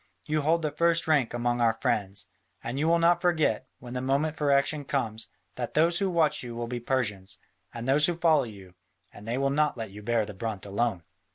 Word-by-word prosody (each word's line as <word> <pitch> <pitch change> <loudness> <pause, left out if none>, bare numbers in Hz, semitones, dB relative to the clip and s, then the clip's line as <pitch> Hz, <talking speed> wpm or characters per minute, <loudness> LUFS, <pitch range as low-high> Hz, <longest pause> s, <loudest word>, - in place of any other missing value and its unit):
You 155 0 0
hold 165 +3 +2
the 150 - 0
first 170 +2 +2
rank 145 -7 +3
among 120 0 -1
our 115 -1 +3
friends. 100 -1 0 0.4
And 120 +4 -3
you 155 - +1
will 170 +1 +4
not 170 +1 +3
forget, 160 - +1
when 120 0 -10
the 125 - -2
moment 140 +4 0
for 150 -2 0
action 140 +2 +2
comes, 115 -6 -3 0.3
that 120 -2 -4
those 170 +2 +3
who 195 -1 +1
watch 160 -4 +2
you 120 -2 -7
will 120 0 -3
be 120 +1 -4
Persians, 105 -7 -2 0.3
and 120 +1 -6
those 145 +3 +4
who 175 - 0
follow 160 -5 +4
you, 100 -5 -12 0.4
and 105 - -12
they 120 +2 -1
will 135 0 +1
not 150 -1 +1
let 110 -3 -5
you 105 +2 -10
bear 115 0 +1
the 105 - -8
brunt 110 -1 -5
alone." 100 -2 -1
130 Hz, 220 wpm, -28 LUFS, 115-155 Hz, 0.4 s, will